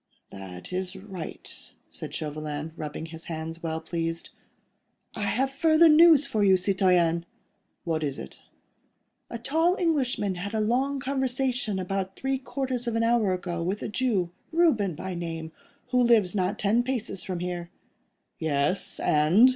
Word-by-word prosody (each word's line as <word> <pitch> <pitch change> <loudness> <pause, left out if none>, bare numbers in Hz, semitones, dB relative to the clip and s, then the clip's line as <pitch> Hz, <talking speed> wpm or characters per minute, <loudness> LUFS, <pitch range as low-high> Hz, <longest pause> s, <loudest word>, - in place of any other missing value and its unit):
"That 95 - -9
is 185 +1 -3
right," 190 -4 -8 0.2
said - - -8
Chauvelin, 150 0 -4
rubbing 155 0 -5
his 160 0 -10
hands, 165 0 -5
well 160 -1 -2
pleased. 165 0 -4 0.8
"I - - -5
have 250 +7 +1
further 315 +3 +5
news 315 -2 +7
for 220 -6 0
you, 190 -2 +6
citoyen." 180 -3 +2 0.6
"What 160 -3 -1
is 140 -2 -2
it?" 65 - -9 0.9
"A 235 - -4
tall 325 +9 +2
Englishman 270 - +1
had 200 +3 -4
a - - +1
long 260 +6 +1
conversation 255 -5 -1
about 190 +1 -3
three 270 0 -1
quarters 260 -2 -3
of 230 - -1
an 230 - +2
hour 230 -4 +3
ago 175 -2 -3
with 190 +5 -2
a - - -3
Jew, 210 -7 0 0.2
Reuben 250 - +3
by 185 +4 -5
name, 165 -2 -5 0.4
who 250 0 +3
lives 230 -6 +4
not 195 +1 0
ten 215 +4 +2
paces 235 -7 -3
from 185 -2 -4
here." 175 -1 -4 0.7
"Yes—and?" 155 - +3
195 Hz, 145 wpm, -27 LUFS, 170-250 Hz, 0.9 s, news